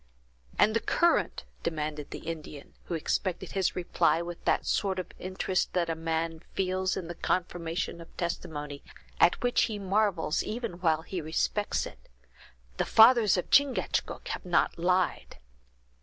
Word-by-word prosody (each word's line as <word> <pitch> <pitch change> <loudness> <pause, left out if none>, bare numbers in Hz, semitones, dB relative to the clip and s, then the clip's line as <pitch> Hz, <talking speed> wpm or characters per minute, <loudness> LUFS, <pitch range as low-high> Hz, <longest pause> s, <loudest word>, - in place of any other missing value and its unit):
"And 215 +1 +4
the - - +4
current!" 340 +7 +1 0.2
demanded 150 -2 -3
the - - -7
Indian, 155 -3 -7
who 170 - -3
expected 175 +3 -2
his 195 -3 0
reply 175 -2 +2
with 170 0 -6
that - - +2
sort 195 -2 0
of 185 - -4
interest 185 0 -1
that 170 -2 +1
a - - -2
man 165 0 -2 0.2
feels 185 0 0
in 180 -3 -4
the 175 - -5
confirmation 170 -1 -2
of 165 - -15
testimony, 150 -4 -4 0.4
at 175 - +5
which 245 0 +3
he 215 -3 -4
marvels 195 -5 +1
even 220 -5 -4
while 160 -2 +2
he 180 0 -4
respects 160 +6 -1
it; - - -12 0.7
"the - - +2
fathers 225 -3 +6
of 180 - -3
Chingachgook 280 -2 +2
have - - -4
not 175 -1 +1
lied!" 180 +1 0
175 Hz, 150 wpm, -29 LUFS, 165-195 Hz, 0.7 s, fathers